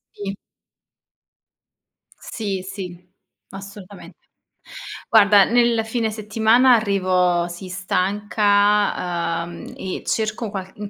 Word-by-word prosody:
Sì. 200 -1 -5 1.8
Sì, 200 -4 -5
sì, 190 -2 -7 0.5
assolutamente. 195 0 -11 0.9
Guarda, 205 -3 +6
nel 235 -1 +2
fine 225 0 -2
settimana 220 +4 +3
arrivo 185 -5 +1
sì, 175 +2 -9
stanca, 195 -2 0
ehm, 170 0 -10
e 190 -1 -5
cerco 220 0 -2
qualc 190 -2 -7
in 210 - -10
200 Hz, 90 wpm, -21 LUFS, 185-215 Hz, 1.8 s, Guarda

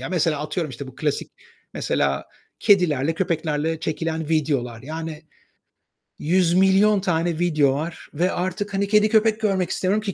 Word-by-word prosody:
Ya, 135 - -5
mesela 165 -4 0
atıyorum, 155 0 -3
işte, 130 +2 -7
bu 130 - -11
klasik 150 0 -2 0.4
mesela 70 -1 0 0.3
kedilerle, 165 -7 +3
köpeklerle 160 -3 -1
çekilen 160 0 -3
videolar. 140 -7 -1
Yani 160 +1 -6 1.0
100.000.000 190 +4 +3
tane 170 -2 0
video 155 -6 +3
var 160 +4 -5
ve 175 +5 +1
artık 185 +3 -3
hani 200 +1 0
kedi, 210 +1 +4
köpek 220 0 +3
görmek 190 -4 +1
istemiyorum 200 +3 0
ki 200 -3 -3
165 Hz, 140 wpm, -23 LUFS, 150-190 Hz, 1.0 s, kedi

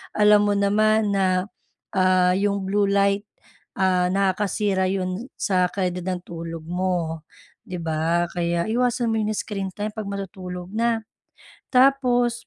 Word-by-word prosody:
alam 210 0 +5
mo 205 - +2
naman 215 +1 +2
na, 190 0 +1 0.4
ah, 185 -2 +3
yung 200 0 0
blue 200 +1 +1
light, 200 +1 +1 0.5
ah, 185 -1 +3
nakakasira 195 0 +1
'yon 190 +5 -3
sa 180 -2 +1
kalidad 180 -2 -2
ng 180 -1 -2
tulog 165 -1 -7
mo, 175 -3 -2 0.4
'di 180 - -5
ba? 165 +2 +1
Kaya 170 +1 -1
iwasan 240 -1 +1
mo 220 - 0
yung 215 0 0
screen 195 -3 -4
time 210 +1 -3
'pag 215 -2 -5
matutulog 185 -2 -6
na. 230 -1 +1 0.7
Tapos 250 -2 +4
195 Hz, 135 wpm, -23 LUFS, 180-210 Hz, 0.7 s, alam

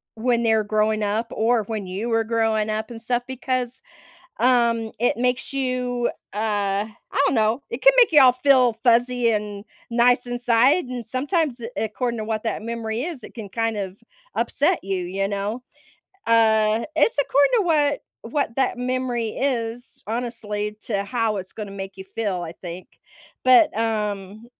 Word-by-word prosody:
when 235 +1 +1
they're 220 -2 +3
growing 215 0 +1
up 210 +3 0
or 225 0 +2
when 215 -2 -4
you 195 +6 -4
were 225 0 +2
growing 220 -1 0
up 215 +1 -2
and 225 -1 -8
stuff 245 +1 -1
because, 255 -1 -3 0.6
um, 235 -2 +2
it 240 -1 +1
makes 250 +3 0
you, 250 -2 -1 0.2
uh 205 -1 0 0.3
I 280 - +2
don't - - +2
know. 220 +2 +2
It - - -4
can - - +8
make 480 -6 +6
you 295 -3 +7
all 255 -2 +8
feel 255 -2 +4
fuzzy 240 0 +3
and 210 -1 -3 0.2
nice 245 +1 +3
inside. 245 +6 +3
And 245 -3 -6
sometimes, 280 - -1
eh, 230 - -5 0.2
according 235 +1 -3
to - - -3
what 215 -1 -3
that 225 - -2
memory 230 0 -3
is, 320 -4 -5
it - - -11
can 215 -4 -8
kind 225 +1 -1
of 195 -1 -5 0.4
upset 330 +5 +1
you. 195 -1 -2
You 195 +2 -2
know? 205 +5 -3 0.6
Uh, 220 -1 +3
it's 460 - +3
according 285 - +3
to 430 - +3
what 295 -4 +2 0.3
what 280 -5 -1
that 265 -2 +1
memory 250 -2 -1
is, 245 0 -3
honestly, 210 -3 -3
to 200 -3 -1
how 225 -2 -1
it's 185 0 -8
gonna 210 -2 -6
make 195 -1 -7
you 190 - -8
feel, 195 -2 -3
I 165 -1 -6
think. 175 +1 -9 0.6
But, 255 0 +6
um, 210 -1 -2
230 Hz, 170 wpm, -23 LUFS, 215-250 Hz, 0.6 s, can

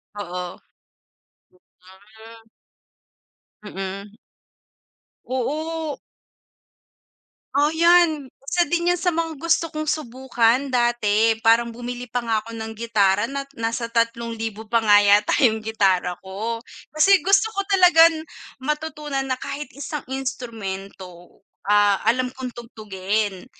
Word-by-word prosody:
Oo. 180 -3 -5 1.3
Hmm. 220 +4 -17 1.2
Mm. 195 +1 -7 1.1
Oo. 310 +4 -3 1.6
Oh, 290 +2 +3
yan 325 -4 +3
isa 350 +5 +2
din 345 0 +1
yan - - -2
sa 355 - +2
mga 325 -1 -2
gusto 335 0 +1
kong 310 0 -3
subukan 260 -2 0
dati 225 -3 +2
parang 230 +1 +4
bumili 245 +1 -6
pa 245 +2 -1
nga 225 -2 +1
ako 230 +2 -11
ng 225 0 -6
gitara 205 -3 +2
nat 275 +1 -5
nasa 230 +1 -2
3,000 230 -2 -2
pa 230 - +3
nga 205 -1 +7
yata 205 +1 +4
yung 220 -3 +4
gitara 190 -5 +1
ko. 220 +5 -4 0.3
Kasi 380 +6 +5
gusto 395 +3 +3
ko 395 - -1
talagang 335 -5 +5 0.4
matutunan 300 -2 -3
na 260 - 0
kahit 280 +2 -6
isang 285 +1 -6
instrumento, 200 -9 -7 0.3
ah, 205 -1 +4
alam 255 +2 +1
kong 255 -2 -7
tugtugin. 210 -4 -3
235 Hz, 110 wpm, -22 LUFS, 210-295 Hz, 1.6 s, nga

